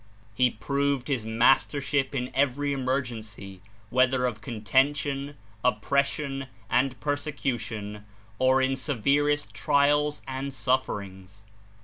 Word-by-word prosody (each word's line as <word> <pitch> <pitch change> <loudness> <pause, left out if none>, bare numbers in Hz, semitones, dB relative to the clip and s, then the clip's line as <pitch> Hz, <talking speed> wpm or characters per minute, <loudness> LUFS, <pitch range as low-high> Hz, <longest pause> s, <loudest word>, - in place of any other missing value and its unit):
He 125 +4 +3
proved 140 +3 -1
his 125 -6 -1
mastership 135 +4 +2
in 125 -1 -2
every 140 +1 +1
emergency, 115 -8 -4 0.3
wheth 130 +1 +4
er 125 -1 +1
of 115 -4 -2
contention, 135 +6 0 0.3
oppression 135 +3 0 0.2
and 130 +1 +1
persecution, 120 -8 -3 0.3
or 130 +1 +4
in 135 0 +1
severest 145 +3 +1
trials 145 +1 +2
and 135 +1 -4
sufferings. 100 -7 -2
130 Hz, 100 wpm, -27 LUFS, 115-140 Hz, 0.3 s, wheth